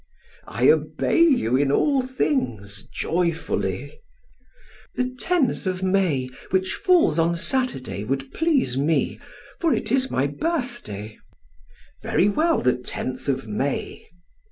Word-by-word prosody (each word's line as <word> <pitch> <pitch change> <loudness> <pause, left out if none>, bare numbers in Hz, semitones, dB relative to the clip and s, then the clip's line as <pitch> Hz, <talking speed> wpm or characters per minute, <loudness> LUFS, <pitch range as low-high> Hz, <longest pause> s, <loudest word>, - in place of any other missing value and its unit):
"I - - +1
obey 335 - +1
you 260 - +4
in 135 +1 +2
all 275 - +3
things 120 - -2
joyfully." 170 - -2 1.0
"The 250 0 -2
tenth 310 - 0
of 185 0 -2
May, 185 -9 +1 0.2
which 190 0 0
falls 355 - +3
on 170 +1 +2
Saturday, 240 - -1
would 135 +4 -3
please 300 - +1
me, 150 +4 0 0.4
for 330 -3 +2
it 215 - -3
is 260 0 +2
my 130 - +1
birthday." 145 - -4 0.8
"Very 200 - +2
well, 320 +10 +2
the 125 - +3
tenth 130 +1 -5
of 135 -2 -1
May." 130 +7 -3
180 Hz, 120 wpm, -23 LUFS, -, 1.0 s, you